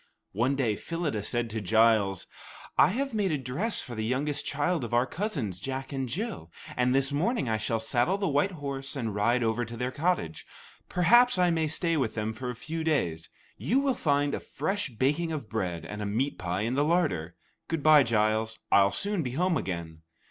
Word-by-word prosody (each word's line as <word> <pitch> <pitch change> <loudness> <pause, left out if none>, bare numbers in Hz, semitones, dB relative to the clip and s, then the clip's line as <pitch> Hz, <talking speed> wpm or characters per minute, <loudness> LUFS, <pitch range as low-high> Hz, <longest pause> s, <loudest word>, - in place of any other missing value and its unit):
One 125 +7 +1
day 120 -6 +1
Phyllida 160 -5 -3
said 120 +3 -1
to 110 0 -3
Giles: 110 -2 +3 0.5
"I - - +6
have 265 +7 -2
made 205 -4 +1
a 150 - +1
dress 140 - 0
for 125 - -8
the 110 -1 -3
youngest 140 +5 -1
child 150 +2 0
of 120 0 -2
our 120 +1 +4
cousins, 135 - -3
Jack 135 +6 -5
and 135 -2 -2
Jill, 190 - -4 0.2
and 125 +1 +2
this 135 +1 +2
morning 170 - 0
I 110 -1 +1
shall 110 +2 -1
saddle 120 - +1
the 200 -1 -1
white 150 +6 +1
horse 140 -3 -4
and 115 -6 -3
ride 115 +4 +2
over 115 +1 0
to 115 0 -7
their 125 +2 -2
cottage. 145 - -1 0.5
Perhaps 240 +7 +5
I 180 -1 +3
may 160 -1 +1
stay 165 +2 0
with 125 -6 -1
them 110 0 -2
for 125 +3 -5
a 125 - -4
few 160 +7 -5
days. 90 - -1 0.3
You 260 - +1
will 275 -1 +1
find 145 - +1
a - - -1
fresh 195 +4 -3
baking 145 +8 0
of 150 -8 -4
bread 90 -7 -3
and 105 +4 -6
a 105 - -2
meat 125 +8 -1
pie 90 +2 -2
in 115 +3 -1
the 140 +2 +2
larder. 90 - 0 0.3
Good 160 -3 -2
bye, 155 -1 +8
Giles; 110 -1 +1
I'll 100 0 +6
soon 200 - -1
be 125 -5 -4
home 175 +4 +1
again." 85 - -4
130 Hz, 205 wpm, -28 LUFS, 110-165 Hz, 0.5 s, bye